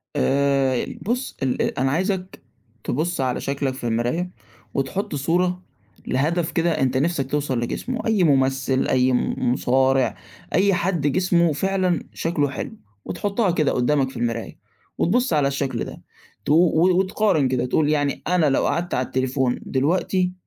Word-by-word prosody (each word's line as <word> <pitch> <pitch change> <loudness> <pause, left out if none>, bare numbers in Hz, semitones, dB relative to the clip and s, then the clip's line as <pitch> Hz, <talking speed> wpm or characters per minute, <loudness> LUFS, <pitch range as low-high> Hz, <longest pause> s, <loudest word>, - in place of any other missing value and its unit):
آآ، 135 - +2 0.2
بُصّ، 250 +4 -3
ال 130 -1 0
أ - - -1
أنا 135 0 +2
عايزك 185 +3 -2 0.4
تبُص، 160 +3 -1
على 130 -1 -1
شكلك 140 -1 -2
في 130 - -10
المراية 120 +11 -1 0.4
وتحط 145 +6 -2
صورة 180 +5 0 0.5
لهدف 160 +6 0
كده 170 0 +1
أنت 130 0 +1
نِفسَك 140 -2 0
توصل 140 -4 0
لجسمُه 240 - -3
أي 210 -5 +3
مُمثل، 135 -2 +2
أي 130 0 +3
م 125 - 0 0.2
مُصارع، 130 +1 +2 0.4
أي 195 0 +3
حد 175 -5 0
جسمُه 170 0 +2
فعلًا 185 +2 0
شكله 155 -4 0
حلو، 130 - -5 0.3
وتحُطّها 200 +2 0
كده 155 -4 +1
قُدّامك 130 +1 +1
في - - -10
المراية 115 -1 -3 0.4
وتبُصّ 245 +5 +1
على 145 -2 +3
الشكل 140 -1 -2
ده - - -9 0.4
تو 145 - +2
و 175 +2 +4
وتقارن 190 -7 +2
كده، 125 -1 0
تقول 145 +4 +1
يعني 145 -2 0
أنا 180 -2 +3
لو 135 - +2
قعدت 175 +1 -1
على 130 - 0
التليفون 130 -1 0
دلوقتي 180 +6 0
145 Hz, 150 wpm, -22 LUFS, 130-180 Hz, 0.5 s, و